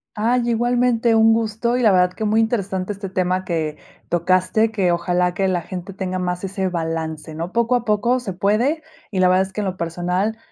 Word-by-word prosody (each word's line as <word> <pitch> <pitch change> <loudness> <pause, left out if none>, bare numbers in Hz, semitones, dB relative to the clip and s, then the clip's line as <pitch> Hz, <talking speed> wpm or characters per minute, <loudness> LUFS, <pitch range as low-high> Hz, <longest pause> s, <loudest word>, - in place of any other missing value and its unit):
Ay, 235 +3 +1
igualmente 240 0 +2
un 225 0 +5
gusto, 225 +1 0
y 250 - 0
la 220 -4 +5
verdad 180 -1 +3
que 220 - -5
muy 215 +1 +2
interesante 200 -4 -1
este 195 -1 -7
tema 185 0 0
que 160 -4 -2 0.3
tocaste, 185 +5 +2
que 195 -5 +1
ojalá 175 +1 +1
que 190 +2 0
la 180 -2 0
gente 180 +3 -7
tenga 185 -1 -3
más 180 0 -2
ese 190 0 -2
balance, 160 -2 -4
¿no? 165 +3 -5
Poco 235 +2 +1
a 245 - 0
poco 230 +3 +1
se 235 -6 -5
puede, 230 - +1 0.3
y 190 - -3
la 185 - +5
verdad 185 +1 +3
es 190 - -17
que 210 - -2
en - - -2
lo 190 -1 -2
personal 180 +5 -2
190 Hz, 210 wpm, -21 LUFS, 180-225 Hz, 0.3 s, un